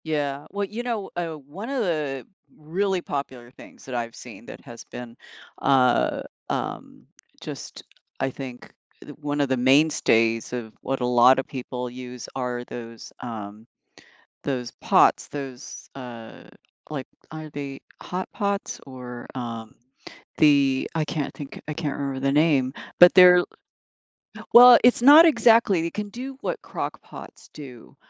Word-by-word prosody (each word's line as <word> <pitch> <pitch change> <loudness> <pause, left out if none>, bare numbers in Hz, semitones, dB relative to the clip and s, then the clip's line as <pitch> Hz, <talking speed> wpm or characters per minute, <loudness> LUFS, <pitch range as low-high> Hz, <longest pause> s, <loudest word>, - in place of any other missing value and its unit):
Yeah, 145 -2 -2
well, 205 0 -2
you 215 +4 -6
know, 230 -5 -3
uh, 170 -2 -3
one 155 - -9
of 270 -4 -1
the 150 -8 -2 0.3
really 185 +4 -1
popular 130 -6 -6
things - - -16
that 130 - -6
I've 115 -1 -4
seen - - -12
that - - -10
has - - -10
been, 120 -1 -10 0.5
uh, 130 -3 +3 0.3
um, - - -5 0.4
just - - -9 0.4
I - - 0
think 130 -2 -9 0.3
th - - -10
one 145 0 -1
of 140 - 0
the 130 - +1
mainstays 125 -4 +3
of 115 -3 -5
what 135 -1 -3
a - - +1
lot 125 +2 +6
of 130 - -4
people 125 -1 -5
use 125 -1 -9
are 125 -2 -3
those, 115 -2 -9
um, 110 -2 -8 0.8
those 125 -4 -3
pots, - - +3
those, 135 -2 -8
uh, 120 -4 -10 0.5
like, 140 -4 -5 0.3
are 155 -1 -8
they 140 -2 -7 0.2
hot 185 +1 -4
pots 200 -1 -3
or, 125 -2 -9
um, 115 -3 -6 0.6
the 140 -3 +4
I 160 -1 0
can't 150 -2 -3
think. 145 -2 -9
I - - -2
can't 150 -3 -3
remember 135 -2 -3
the 135 0 +1
name. 145 -3 +2 0.3
But 175 0 +9
they're 180 -1 +8 1.1
Well, 245 0 +10
it's 245 -1 +5
not 295 +6 +9
exactly. 225 - +4
It 170 - -4
can 210 -1 -4
do 260 +5 -7
what - - -3
crock - - -5
pots - - -13
do, 130 -6 -12
140 Hz, 150 wpm, -24 LUFS, 125-170 Hz, 1.1 s, Well